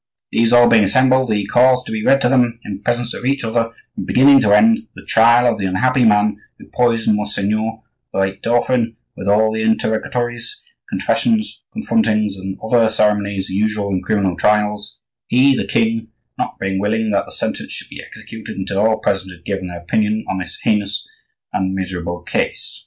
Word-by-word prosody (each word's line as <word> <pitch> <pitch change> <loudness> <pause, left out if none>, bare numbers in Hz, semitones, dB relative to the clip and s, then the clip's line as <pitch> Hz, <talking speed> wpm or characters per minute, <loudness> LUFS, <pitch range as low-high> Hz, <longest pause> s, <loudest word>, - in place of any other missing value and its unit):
These 115 0 +2
all 120 0 +6
being 110 -2 +5
assembled, 130 +4 +3
he 105 -2 0
caused 125 +4 +3
to - - -7
be 110 -1 -3
read 135 +3 +3
to 125 - +3
them, 120 -3 +2
in 100 -1 -6
presence 120 +1 -1
of - - -8
each 135 +1 0
other, 115 0 0 0.2
from - - -6
beginning 135 +2 +5
to 105 - +2
end, 225 - +4
the - - -13
trial 120 +2 +4
of 115 -3 +1
the 95 - -1
unhappy 125 +7 +1
man 105 -1 +3 0.2
who - - -14
poisoned 115 -3 +2
Monseigneur 110 +2 -2 0.3
the - - -5
late 95 0 -1
dauphin,—with 115 -3 -1
all 110 +2 +3
the 110 0 -2
interrogatories, 120 - -2 0.3
confessions, 220 -2 0
confrontings, 110 - 0
and 95 0 -7
other 115 0 +3
ceremonies 100 -2 0
usual 105 0 -1
in 95 -1 -1
criminal 95 -4 0
trials; 105 +1 0 0.3
he, 130 +3 +4
the - - -3
king, 115 0 0 0.3
not - - -4
being 95 -1 -2
willing 110 +2 0
that 100 -1 0
the - - -13
sentence - - -4
should - - -7
be - - -9
executed 110 -3 -10
until 95 +1 -3
all 110 +1 +3
present 95 -3 -2
had 85 -1 -16
given 95 -2 -3
their 90 -1 -8
opinion 105 +4 -1
on 95 - -2
this 90 -2 -6
heinous 105 -1 0 0.5
and 95 0 -1
miserable 90 -2 -4
case." - - -3
110 Hz, 180 wpm, -18 LUFS, 100-120 Hz, 0.5 s, all